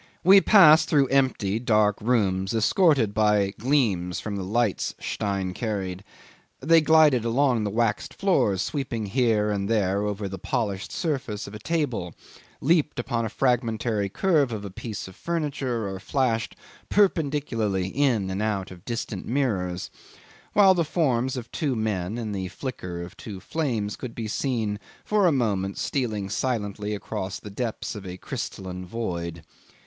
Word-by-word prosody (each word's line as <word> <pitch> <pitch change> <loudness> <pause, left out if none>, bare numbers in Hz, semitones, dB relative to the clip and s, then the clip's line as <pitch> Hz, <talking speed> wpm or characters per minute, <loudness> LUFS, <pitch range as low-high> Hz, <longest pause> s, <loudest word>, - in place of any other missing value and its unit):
We 195 +2 +8
passed 165 -8 +7
through 140 -4 +3
empty 125 -7 +1
dark 105 -3 +2
rooms, 100 -4 +1
escorted 130 - +3
by 105 -2 +2
gleams 105 -9 +1
from 105 -2 -4
the 100 - -3
lights 110 +2 0
Stein 95 -3 -2
carried. 95 -4 -3 0.6
They 165 +4 +5
glided 155 -6 +5
along 120 -1 +2
the - - 0
waxed 115 +1 -1
floors, 105 - +2
sweeping 125 -7 -3
here 105 -1 +2
and 100 0 -2
there 100 -3 +1
over 105 -1 -2
the 95 -1 -6
polished 100 -1 -2
surface 130 - -2
of 100 - -10
a 105 - -7
table, 125 - -2 0.5
leaped 155 0 +2
upon 120 -1 -1
a - - -2
fragmentary 115 -4 0
curve 150 - +2
of 105 -2 -4
a 100 - -6
piece 105 +1 -6
of 95 - -12
furniture, 140 -9 -2
or 95 -1 -5
flashed 115 +1 -1 0.3
perpendicularly 140 - +1
in 115 -7 +1
and 95 +2 -2
out 105 -3 -1
of 90 -1 -12
distant 115 -4 -4
mirrors, 100 -9 -1 0.6
while 195 -2 +7
the 175 -2 +1
forms 130 -6 0
of 120 -2 -7
two 145 -6 -1
men 105 -2 -2
and 110 -3 -4
the 95 -2 -3
flicker 90 -5 -6
of 85 - -10
two 100 -4 -8
flames 110 - -2
could 125 -3 -7
be 115 -2 -4
seen 110 -3 -1 0.3
for 210 -3 +3
a - - +4
moment 100 -8 0
stealing 110 -9 -2
silently 105 -2 -2
across 95 -1 -5
the 105 - -10
depths 115 +3 -3
of 105 -4 -8
a 90 -1 -7
crystalline 90 -1 -6
void. 85 -5 -4
110 Hz, 155 wpm, -25 LUFS, 100-130 Hz, 0.6 s, We